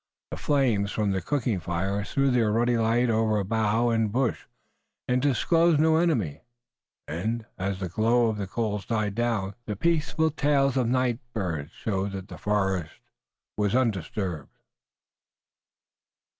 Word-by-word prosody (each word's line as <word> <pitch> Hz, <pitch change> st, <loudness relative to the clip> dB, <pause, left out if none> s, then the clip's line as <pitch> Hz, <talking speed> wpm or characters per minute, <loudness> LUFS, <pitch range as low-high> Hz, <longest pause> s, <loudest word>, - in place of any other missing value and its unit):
The -, -, -4 dB
flames 120 Hz, -9 st, +1 dB
from 105 Hz, -2 st, 0 dB
the 95 Hz, -1 st, -1 dB
cooking 120 Hz, -, -1 dB
fires 95 Hz, +4 st, -2 dB
threw 135 Hz, -1 st, +2 dB
their 115 Hz, -4 st, +2 dB
ruddy 120 Hz, +2 st, +2 dB
light 115 Hz, +2 st, +2 dB
over 110 Hz, -2 st, +1 dB
bough 110 Hz, +3 st, +1 dB
and 115 Hz, -2 st, +1 dB
bush, 125 Hz, +2 st, 0 dB, 0.6 s
and 125 Hz, 0 st, +1 dB
disclosed 165 Hz, +4 st, +3 dB
no 160 Hz, +1 st, +4 dB
enemy, 115 Hz, -, 0 dB, 0.7 s
and, 110 Hz, +8 st, -3 dB
as 95 Hz, 0 st, -2 dB
the 95 Hz, -, -3 dB
glow 115 Hz, +7 st, +2 dB
of 110 Hz, -2 st, 0 dB
the 100 Hz, -2 st, -3 dB
coals 105 Hz, 0 st, -3 dB
died 110 Hz, -3 st, 0 dB
down, 110 Hz, -4 st, -1 dB
the 105 Hz, -, -2 dB
peaceful 160 Hz, -, +1 dB
tails 140 Hz, -2 st, +2 dB
of 130 Hz, -3 st, +1 dB
the -, -, 0 dB
night 125 Hz, -2 st, +1 dB
birds 85 Hz, -9 st, -3 dB
showed 100 Hz, -2 st, -2 dB
that 95 Hz, -1 st, -7 dB
the -, -, -9 dB
forest 95 Hz, -5 st, -1 dB, 0.6 s
was 105 Hz, +1 st, 0 dB
undisturbed. 95 Hz, -, -2 dB
110 Hz, 145 wpm, -26 LUFS, 100-125 Hz, 0.7 s, no